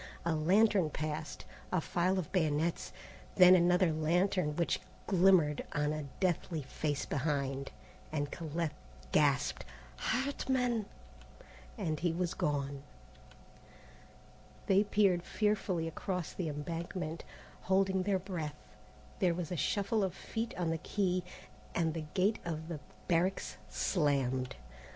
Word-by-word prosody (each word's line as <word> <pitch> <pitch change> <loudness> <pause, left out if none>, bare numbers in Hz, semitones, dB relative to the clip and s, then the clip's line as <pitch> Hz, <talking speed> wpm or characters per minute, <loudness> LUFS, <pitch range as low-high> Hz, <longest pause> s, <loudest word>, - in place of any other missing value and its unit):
A 170 - +2
lantern 185 +3 +4
passed, 155 0 -4 0.3
a 185 - +2
file 180 +4 +1
of 180 -5 -3
bayonets, 160 -2 0 0.4
then 180 -1 +9
another 180 -1 +4
lantern 165 0 +1
which 170 0 +1 0.3
glimmered 180 -6 +4
on 150 0 +1
a 155 -2 -4
deathly 175 -4 0
face 145 +2 -2
behind, 140 -2 -1 0.4
and 145 -2 -2
Colette 165 -1 -3 0.4
gasped, 140 -2 +2 0.3
"Hartman!" 250 -4 0 0.9
and 160 -8 -1
he 175 -1 +1
was 175 +1 -1
gone. 140 -3 -1 1.8
They 195 +2 +4
peered 195 -4 +3
fearfully 195 -4 0
across 180 +1 -3
the 175 -4 -2
embankment, 165 +2 -4 0.4
holding 190 0 +2
their 195 +1 +1
breath. 170 -6 -4 0.6
There 175 -3 +3
was 175 -2 -4
a - - -1
shuffle 200 +5 +1
of 190 - -1
feet 230 +1 -4
on 170 -2 0
the 165 - -1
quay, 185 0 0 0.5
and 165 -2 +1
the 160 -1 -4
gate 195 +4 +2
of 160 -1 -4
the 165 -3 -4 0.3
barracks 175 - +1
slammed. 135 - 0
170 Hz, 120 wpm, -33 LUFS, 155-190 Hz, 1.8 s, then